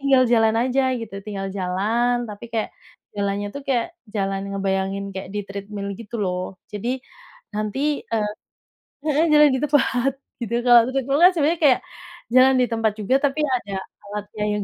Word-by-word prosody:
tinggal 275 -2 +4
jalan 225 -1 +4
aja 260 +2 +1 0.2
gitu, 225 -3 -8
tinggal 195 -2 -4
jalan, 210 +7 +1
tapi 210 +2 -8
kaya 220 -2 0 0.5
jalannya 200 0 -1
tuh 280 - -5
kayak 245 -4 +2 0.3
jalan 195 -1 -1
ngebayangin 195 0 -1
kaya 190 - -5
di 210 - 0
treadmill, 200 0 -6
gitu 230 +1 -7
loh. 180 -1 -1 0.3
Jadi 210 +3 -4 0.7
nanti, 215 +4 -2 0.3
eee, 215 -2 +1 0.8
heeh, 305 +1 +3
jalan 300 0 +7
di - - -1
tempat 275 -3 +2 0.3
gitu, 235 -1 -3
kalau 240 -1 +9
treadmill 275 +1 0
kan 360 - +9
sebenarnya 320 +1 +2
kayak 260 -4 +6 0.6
jalan 260 +1 +7
di - - +4
tempat 225 -1 +1
juga, 215 +5 +1
tapi 285 +2 -1
ada 245 -7 -2 0.3
alatnya 210 +1 -5
yang 210 -1 -1
225 Hz, 160 wpm, -22 LUFS, 200-260 Hz, 0.8 s, kalau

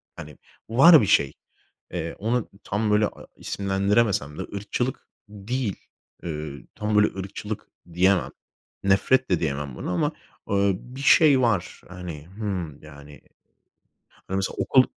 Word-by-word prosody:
hani, 75 -2 -10 0.3
var 150 +7 +8
bir 105 - +1
şey. 70 -8 +3 0.6
Eee 85 -2 -4
ona, 115 +4 +1
ımm, 115 - -5
tam 105 +2 -1
böyle 105 0 +4
a - - -12
isimlendiremesem 100 -5 0
de - - -1
ırkçılık 120 +5 -3 0.2
değil. 105 +1 -3 0.5
Iıı, 75 -3 -5
tam 105 0 -1
böyle 105 0 +6
ırkçılık 100 +2 -6 0.3
diyemem. 95 +1 +3 0.5
Nefret 110 +7 +3
de 90 -3 +2
diyemem 70 -4 -3
buna. - - -4
Ama, 90 - +1 0.4
ııı, 100 -1 +3
bir 130 +2 -10
şey 140 -1 +6
var 105 -8 0
hani, 85 -5 -8
hımm, 95 -7 -5
yani. 75 -1 -13 1.1
Hani, 95 - -3
mesela 95 - -2
okul 130 - +5
100 Hz, 135 wpm, -25 LUFS, 85-110 Hz, 1.1 s, var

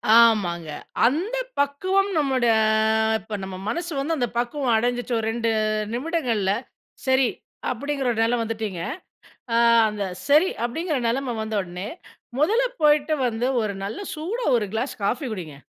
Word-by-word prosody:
ஆமாங்க. 190 -9 +4 0.4
அந்த 370 - -1 0.2
பக்குவம் 375 +8 +1
நம்மோட 265 -4 +1 0.7
இப்போ 215 +1 -6
நம்ம 190 -1 -6
மனசு 345 +5 -3
வந்து 320 +4 0
அந்த 245 -2 +1
பக்குவம் 245 0 0
அடைஞ்சிட்டு, 245 +1 -1
ஒரு 220 - -2
2 230 0 -1 0.4
நிமிடங்கள்ல, 245 - 0 0.6
சரி. 260 -2 +4 0.4
அப்படிங்கிற 275 +2 -2
ஒரு 225 - -2
நிலை 235 +2 +2
வந்துட்டிங்க. 215 -6 -3 0.7
ஆ - - +3 0.3
அந்த 210 -1 -3 0.2
சரி 305 +6 +5
அப்படிங்கிற 305 +5 -1
நெலைமை 250 +1 -1
வந்த 220 0 -4
உடனே, 180 +2 -6 0.5
முதல்ல 450 +11 +3 0.2
போய்ட்டு 300 +1 +4
வந்து 235 +2 -1
ஒரு 210 -2 -2
நல்ல 205 - -4
சூடா 375 +11 -3
ஒரு 210 - -1
கிளாஸ் 245 +5 -1
காஃபி 250 +6 0
குடிங்க. 165 -8 -6
245 Hz, 140 wpm, -24 LUFS, 220-295 Hz, 0.7 s, சரி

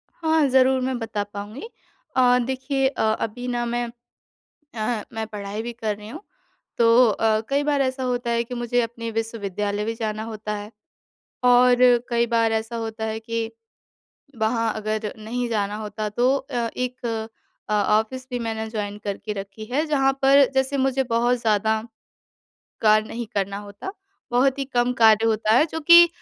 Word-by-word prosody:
हाँ, 320 -2 +2
ज़रूर 260 0 +4
मैं 255 0 -1
बता 215 -3 -3
पाऊँगी। 205 - -8 0.5
अ, 250 -1 +5
देखिए 265 +1 0
अ, 270 - -3 0.2
अभी 245 +3 -4
ना 240 -1 -1
मैं 240 0 -1 0.9
आह, 215 0 -1
मैं 220 0 -3
पढ़ाई 210 0 -5
भी 240 - -5
कर 220 -3 -3
रही 210 +1 -11
हूँ। 315 - -8 0.6
तो 235 +1 +6
अ, 215 +1 +1
कई 280 +1 +1
बार 290 -1 +1
ऐसा 260 0 -2
होता 245 -1 -1
है 235 0 +1
कि 245 +1 -7
मुझे 240 0 0
अपने 230 0 -5
विश्वविद्यालय 210 -2 -3
भी 225 - -2
जाना 215 -1 -3
होता 215 -1 -5
है। 205 +1 -8 0.7
और 245 0 +6 0.3
कई 235 -1 +2
बार 230 -1 +2
ऐसा 225 +1 -2
होता 225 -1 -4
है 220 0 -2
कि, 230 0 -3 0.9
वहाँ 225 +1 +1
अगर 215 0 -2
नहीं 240 +3 -3
जाना 205 -2 -1
होता 215 0 -4
तो 245 +5 +2
अ, 250 -4 -3
एक 250 0 -3 0.6
अ, 210 - 0
ऑफ़िस 220 +5 +1
भी 245 - -3
मैंने 220 -1 -3
जॉइन 205 -2 -4
करके 205 +1 -4
रखी 200 +2 -7
है 295 +5 +1
जहाँ 270 -3 +2
पर 275 +1 +6
जैसे 265 +1 +1
मुझे 265 0 +1
बहुत 240 +1 +1
ज़्यादा 220 0 +1 1.0
कार्य 215 0 +4
नहीं 235 0 -5
करना 200 0 -1
होता। 205 - -8 0.4
बहुत 260 +3 +2
ही 275 - -1
कम 245 -2 0
कार्य 220 0 +6
होता 215 -1 +2
है 290 - +6
जो 320 - -4
कि 340 +2 +8
230 Hz, 170 wpm, -23 LUFS, 215-250 Hz, 1.0 s, कि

